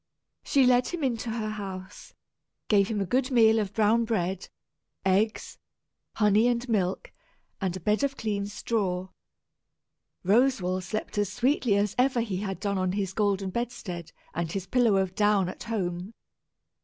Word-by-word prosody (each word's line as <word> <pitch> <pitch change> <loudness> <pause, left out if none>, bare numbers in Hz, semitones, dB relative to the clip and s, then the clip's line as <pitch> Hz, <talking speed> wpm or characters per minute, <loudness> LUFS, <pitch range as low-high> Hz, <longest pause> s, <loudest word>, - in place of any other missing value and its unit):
She 275 -2 +3
led 250 0 +4
him 345 -4 -4
into 235 -3 -1
her 220 -1 -2
house, 195 -2 -8 0.5
gave 200 -2 +4
him 215 -1 -2
a - - 0
good 255 +7 +1
meal 225 -3 +5
of 200 -3 -2
brown 220 +2 +3
bread, 190 -4 -2 0.6
eggs, 200 +4 0 0.6
honey 210 +2 +4
and 245 +1 0
milk, 195 -5 -1 0.5
and 185 -1 -1
a - - -8
bed 210 +7 +1
of 275 -1 -1
clean 205 -3 -2
straw. 190 -4 -2 1.1
Roswal 195 -3 +2
slept 215 +2 -4
as 205 -2 0
sweetly 245 -3 +1
as 205 0 +1
ever 255 -1 +3
he 210 -5 -2
had 195 -2 -4
done 200 -1 -1
on 185 0 0
his 195 -2 -2
golden 200 -2 0
bedstead 185 -8 -5 0.2
and 170 -1 -2
his 190 0 -3
pillow 235 -3 +3
of 190 -1 0
down 205 -2 +2
at 185 - -7
home. 190 -2 -3
205 Hz, 155 wpm, -27 LUFS, 190-230 Hz, 1.1 s, meal